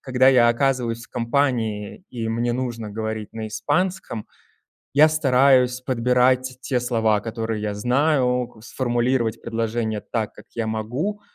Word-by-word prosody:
когда 130 0 +3
я 125 -3 +6
оказываюсь 120 -2 0
в - - -22
компании, 115 - -1
и 115 -2 -4
мне 120 +1 0
нужно 120 -4 -3
говорить 110 0 -4
на 110 -1 -5
испанском, 115 - -2 0.7
я 150 +3 +6
стараюсь 130 -4 +3
подбирать 125 0 +2
те 125 -3 0
слова, 110 -3 +1
которые 110 0 -4
я 105 -1 -2
знаю, 125 +1 +1
к 110 - -18
сформулировать 120 -2 0
предложение 115 -1 -2
так, 110 0 -3
как - - -15
я 115 -1 -2
могу. 125 - -3
120 Hz, 140 wpm, -23 LUFS, 110-130 Hz, 0.7 s, я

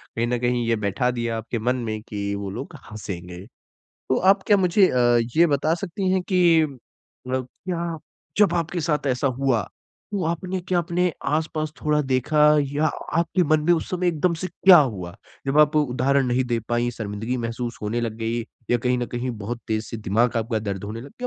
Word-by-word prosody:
कहीं 115 +1 0
न 125 0 0
कहीं 120 0 0
ये 115 - +3
बैठा 105 +4 0
दिया 115 -2 -2
आपके 115 +1 -4
मन 125 +3 +1
में 110 -1 -3
कि 100 -2 -4
वो 100 -1 -4
लोग - - -7 0.2
हँसेगे। 90 -3 -7 0.6
तो 130 - +2
आप 195 +1 +4
क्या 205 - +5
मुझे 185 +1 +4 0.5
ये 170 - +6
बता 155 +1 +1
सकती 190 +1 -3
हैं 190 -1 +1
कि 175 -4 +4
मतलब 130 -1 -7 0.2
क्या 170 -2 -2 0.4
जब 200 -4 +5
आपके 170 +1 -1
साथ 150 -2 -1
ऐसा 130 +1 +1
हुआ 130 -6 +2 0.5
तो 190 -4 -1
आपने 180 +3 -2
क्या 180 0 0
आप 170 - 0
अपने 175 0 0
आसपास 155 0 -1
थोड़ा 150 0 +2
देखा 140 +4 +1 0.3
या 150 +2 +1 0.3
आपके 170 +2 +1
मन 155 0 +3
में 175 - +6
उस 165 - 0
समय 180 0 -1
एकदम 170 +1 +1
से 175 +3 -4
क्या 190 -2 +7
हुआ? 95 -11 -1 0.3
जब 135 +2 +2
आप 150 +1 +5
उदाहरण 135 -1 +2
नहीं 125 +1 +1
दे 120 -2 0
पाई 120 0 +1
शर्मिंदगी 110 +4 -3
महसूस 120 0 -4
होने 110 +3 -1
लग 115 -2 -3
गयी 115 +1 -2 0.3
या 120 - +3
कहीं 125 +1 0
न 120 - -2
कहीं 125 +1 -3
बहुत 115 +3 -5
तेज़ 110 0 -1
से - - -6
दिमाग 115 +3 +1
आपका 115 0 0
दर्द 100 -2 -4
होने 110 +2 -5
लग 130 - -9
गया। - - -30
130 Hz, 200 wpm, -23 LUFS, 115-165 Hz, 0.6 s, क्या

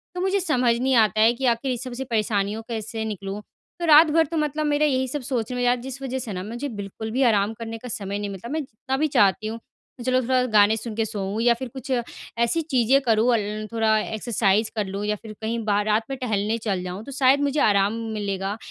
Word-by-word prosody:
तो 360 - -3
मुझे 385 +1 +1
समझ 255 -10 +2
नहीं 260 +1 +2
आता 215 -2 +4
है 225 +2 +6
कि 260 +2 -3
आख़िर 240 +2 +1
इस 250 0 -3
सब 255 -2 -7
से 255 +2 -4
परेशानियों 215 -1 0
कैसे 220 -1 -4
निकलूँ? 200 -1 -5 0.4
तो 345 - -2
रात 315 0 +8
भर 325 +1 +4
तो 325 +2 -4
मतलब 305 0 -1
मेरा 295 0 +2
यही 260 -3 +1
सब 290 +3 -4
सोचने 250 -2 -3
में 245 - -1
यार 245 0 +4
जिस 265 +2 -8
वज़ह 260 -1 -3
से 230 -5 -5
ना 180 0 -4
मुझे 240 +7 -5
बिल्कुल 215 0 -6
भी 260 +4 +1
आराम 215 -3 +3
करने 225 0 -6
का 250 - -10
समय 200 -3 -4
नहीं 205 0 -3
मिलता। 195 +3 -8
मतलब - - -4
मैं 315 - 0
जितना 265 0 -4
भी 310 +3 +2
चाहती 210 -5 +3
हूँ 225 +1 -5 0.5
चलो 255 0 +2
थोड़ा 255 +1 +2
गाने 215 -2 +4
सुन 225 -1 -6
के 225 0 0
सोऊँ 205 0 -3
या 240 0 +5
फिर 260 - -4
कुछ 270 +1 -7 0.5
ऐसी 235 +8 +1
चीज़ें 270 -4 +3
करूँ 230 -1 +3
अ, - - +4
ल 215 0 -4
थोड़ा 220 -1 +2
एक्सरसाइज़ 215 -1 0
कर 210 -2 0
लूँ 195 +2 -5
या 210 0 0
फिर 220 -2 -9
कहीं 225 +1 -2
बाहर 205 -1 +1
रात 215 +1 +2
में 270 - -3
टहलने 220 -3 -1
चल 200 -5 -2
जाऊँ। 180 +3 -6
तो - - -8
शायद 275 +1 +3
मुझे 285 +1 0
आराम 200 0 +3 0.2
मिलेगा 200 -1 -3
230 Hz, 245 wpm, -24 LUFS, 210-260 Hz, 0.5 s, रात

